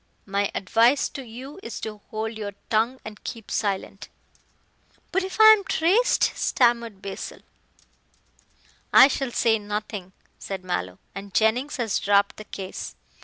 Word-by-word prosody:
"My 200 Hz, 0 st, 0 dB
advice 230 Hz, +8 st, +3 dB
to 275 Hz, -, -7 dB
you 260 Hz, +8 st, -10 dB
is 235 Hz, -, -6 dB
to 210 Hz, -1 st, -6 dB
hold 220 Hz, +1 st, -4 dB
your 205 Hz, -2 st, -6 dB, 0.2 s
tongue 230 Hz, +4 st, +1 dB
and 210 Hz, -1 st, -9 dB
keep 230 Hz, -3 st, -7 dB
silent." 200 Hz, 0 st, -2 dB, 1.0 s
"But 385 Hz, +2 st, +1 dB
if 380 Hz, +3 st, -6 dB
I 435 Hz, 0 st, +10 dB
am 415 Hz, -2 st, 0 dB
traced?" 385 Hz, +8 st, +2 dB
stammered 235 Hz, -5 st, +1 dB
Basil. 195 Hz, -1 st, -6 dB, 1.5 s
"I -, -, +9 dB
shall 270 Hz, -1 st, -2 dB
say 225 Hz, -2 st, +2 dB
nothing," 205 Hz, -2 st, -5 dB, 0.3 s
said 190 Hz, -2 st, -6 dB
Mallow, 90 Hz, -, -3 dB, 0.2 s
"and 195 Hz, 0 st, -9 dB
Jennings 245 Hz, +7 st, +2 dB
has 230 Hz, -5 st, 0 dB
dropped 200 Hz, 0 st, +2 dB
the 215 Hz, -, -9 dB
case. 190 Hz, -2 st, -7 dB
220 Hz, 140 wpm, -25 LUFS, 200-255 Hz, 1.5 s, I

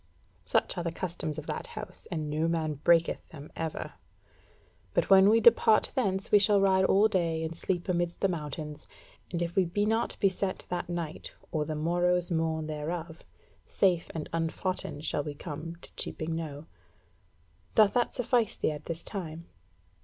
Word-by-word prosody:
Such 90 Hz, -, +1 dB
are -, -, -2 dB
the 170 Hz, -, -1 dB
customs 165 Hz, -3 st, -4 dB
of 155 Hz, -, -5 dB
that -, -, -4 dB
house, 210 Hz, -1 st, -4 dB
and 155 Hz, -4 st, -3 dB
no 155 Hz, +2 st, 0 dB
man 160 Hz, -2 st, 0 dB
breaketh 170 Hz, -1 st, +3 dB
them 150 Hz, -2 st, -11 dB
ever. 160 Hz, -1 st, -4 dB, 1.0 s
But -, -, +1 dB
when 195 Hz, +1 st, +8 dB
we 225 Hz, +2 st, +5 dB
depart 225 Hz, -1 st, +5 dB
thence 195 Hz, -7 st, -1 dB
we 205 Hz, -, +8 dB
shall 200 Hz, 0 st, +4 dB
ride 190 Hz, -1 st, +4 dB
all 200 Hz, +3 st, +5 dB
day 170 Hz, -5 st, 0 dB
and 160 Hz, +1 st, -4 dB
sleep 175 Hz, +1 st, -2 dB
amidst 175 Hz, -1 st, -1 dB
the 195 Hz, -, +4 dB
mountains, 150 Hz, -3 st, -5 dB, 0.4 s
and 175 Hz, -1 st, -1 dB
if 170 Hz, 0 st, -4 dB
we 190 Hz, -, +5 dB
be 195 Hz, +4 st, 0 dB
not 225 Hz, +2 st, 0 dB
beset 195 Hz, -1 st, 0 dB
that 175 Hz, -1 st, -3 dB
night 170 Hz, -3 st, -5 dB, 0.2 s
or 155 Hz, -2 st, 0 dB
the 155 Hz, -, -3 dB
morrow's 175 Hz, +3 st, +1 dB
morn 160 Hz, -1 st, 0 dB
thereof, 160 Hz, +2 st, -5 dB, 0.4 s
safe 180 Hz, -4 st, +2 dB
and 160 Hz, -, -3 dB
unfoughten 165 Hz, -1 st, -2 dB
shall 150 Hz, -, 0 dB
we 145 Hz, -1 st, -5 dB
come 165 Hz, +2 st, -6 dB
to -, -, -12 dB
Cheaping 160 Hz, 0 st, -4 dB
Knowe. 155 Hz, -2 st, -5 dB, 1.1 s
Doth 215 Hz, -2 st, +6 dB
that 245 Hz, -1 st, +1 dB
suffice 240 Hz, -3 st, +1 dB
thee -, -, 0 dB
as 150 Hz, -, -4 dB
at 150 Hz, -, -18 dB
this 165 Hz, 0 st, -4 dB
time?" 170 Hz, -4 st, -6 dB
170 Hz, 175 wpm, -29 LUFS, 160-190 Hz, 1.1 s, when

